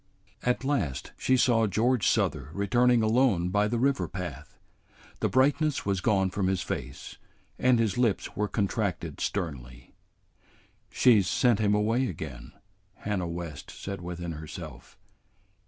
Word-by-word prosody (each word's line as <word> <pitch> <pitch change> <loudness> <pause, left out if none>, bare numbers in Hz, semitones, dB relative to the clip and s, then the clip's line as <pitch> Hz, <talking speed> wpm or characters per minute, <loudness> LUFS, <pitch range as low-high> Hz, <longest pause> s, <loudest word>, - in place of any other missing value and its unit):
At 125 +1 0
last 100 - -1
she 130 - +2
saw 115 -3 +3
George 115 +3 +1
Souther - - +1
returning 120 +4 +3
alone 110 -6 +2
by 105 +2 +2
the 120 +2 -1
river 125 -8 +1
path. 80 -5 -7 0.6
The - - 0
brightness 145 +3 +2
was 100 -2 0
gone 95 -3 +2
from 95 -1 -1
his 95 -1 0
face, 70 +2 -6 0.4
and 125 -1 +4
his 115 -1 0
lips 115 -5 0
were 105 +1 0
contracted 100 - -2
sternly. 65 -10 -4 1.0
"She 115 -5 +5
's 90 - -4
sent 120 -1 +2
him 105 -1 +2
away 115 +5 +1
again," 75 - -7 0.4
Hannah 100 -4 -3
West 85 -4 -6
said 100 -2 -7
within 85 -1 -5
herself. 80 -1 -9
100 Hz, 140 wpm, -28 LUFS, 85-120 Hz, 1.0 s, She